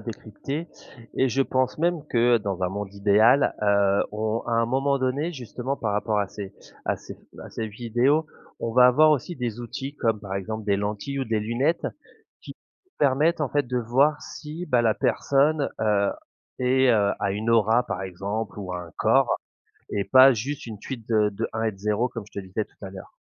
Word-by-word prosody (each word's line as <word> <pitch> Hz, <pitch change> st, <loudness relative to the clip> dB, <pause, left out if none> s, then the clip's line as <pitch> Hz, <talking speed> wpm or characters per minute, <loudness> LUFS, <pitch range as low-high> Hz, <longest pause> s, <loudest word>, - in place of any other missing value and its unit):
décrypter 125 Hz, +8 st, -6 dB, 0.5 s
et 130 Hz, -, +2 dB
je 135 Hz, +3 st, +2 dB
pense 130 Hz, -1 st, 0 dB
même 170 Hz, -2 st, 0 dB
que 120 Hz, -2 st, +3 dB
dans 100 Hz, -3 st, -4 dB
un 90 Hz, -, +2 dB
monde 100 Hz, 0 st, -5 dB
idéal, 105 Hz, +7 st, +4 dB
heu, 100 Hz, -1 st, +3 dB
on 110 Hz, +1 st, -1 dB
à 120 Hz, -, -2 dB
un 115 Hz, 0 st, +3 dB
moment 135 Hz, +3 st, +1 dB
donné 135 Hz, +6 st, -1 dB
justement 130 Hz, -1 st, -5 dB
par 110 Hz, -5 st, -2 dB
rapport 105 Hz, +1 st, 0 dB
à 100 Hz, -, +1 dB
ces 100 Hz, 0 st, -8 dB, 0.3 s
à -, -, +1 dB
ces -, -, -11 dB, 0.3 s
à -, -, -10 dB
ces 110 Hz, -, -4 dB
vidéos, 120 Hz, +8 st, +1 dB, 0.3 s
on 115 Hz, -, -2 dB
va 125 Hz, +1 st, +7 dB
avoir 155 Hz, +5 st, +6 dB
aussi 150 Hz, +4 st, 0 dB
des 120 Hz, -2 st, -4 dB
outils 135 Hz, +4 st, -6 dB
comme 115 Hz, -6 st, 0 dB
par 95 Hz, -2 st, -6 dB
exemple 110 Hz, +2 st, -5 dB
des 100 Hz, -1 st, +2 dB
lentilles 105 Hz, +7 st, -3 dB
ou 135 Hz, -, -1 dB
des 110 Hz, -1 st, 0 dB
lunettes 120 Hz, +10 st, 0 dB, 0.6 s
qui -, -, -10 dB, 0.4 s
permettent 150 Hz, +4 st, +2 dB
en 150 Hz, -, 0 dB
fait 145 Hz, -2 st, +1 dB
de 125 Hz, +1 st, -1 dB
voir 135 Hz, +6 st, +2 dB
si, 155 Hz, +3 st, -7 dB
bah, 125 Hz, -6 st, +2 dB
la 115 Hz, -2 st, +3 dB
personne, 140 Hz, +4 st, +1 dB
heu, 105 Hz, -2 st, +2 dB, 0.5 s
et 130 Hz, +1 st, +3 dB
heu, 100 Hz, -3 st, +3 dB
a 100 Hz, -, +1 dB
une 110 Hz, +3 st, -2 dB
aura 115 Hz, +1 st, +4 dB
par 95 Hz, -2 st, -4 dB
exemple 100 Hz, +3 st, -4 dB
ou 90 Hz, -2 st, -5 dB
a 90 Hz, -, -3 dB
un 85 Hz, -2 st, -11 dB
corps -, -, +3 dB, 0.6 s
et 100 Hz, -1 st, -2 dB
pas 130 Hz, +7 st, +8 dB
juste 130 Hz, +6 st, -4 dB
une 110 Hz, -4 st, -8 dB
suite 120 Hz, -1 st, -7 dB
de 110 Hz, -2 st, +3 dB
de 100 Hz, -, -3 dB
1 110 Hz, 0 st, -2 dB
et 110 Hz, -, +1 dB
de -, -, -17 dB
0 105 Hz, +4 st, 0 dB
comme 115 Hz, -3 st, -7 dB
je -, -, -5 dB
te 95 Hz, -, -8 dB
disais 95 Hz, +4 st, -2 dB
tout 105 Hz, -, -13 dB
à -, -, -6 dB
l'heure. 95 Hz, 0 st, -11 dB
115 Hz, 205 wpm, -25 LUFS, 105-135 Hz, 0.6 s, pas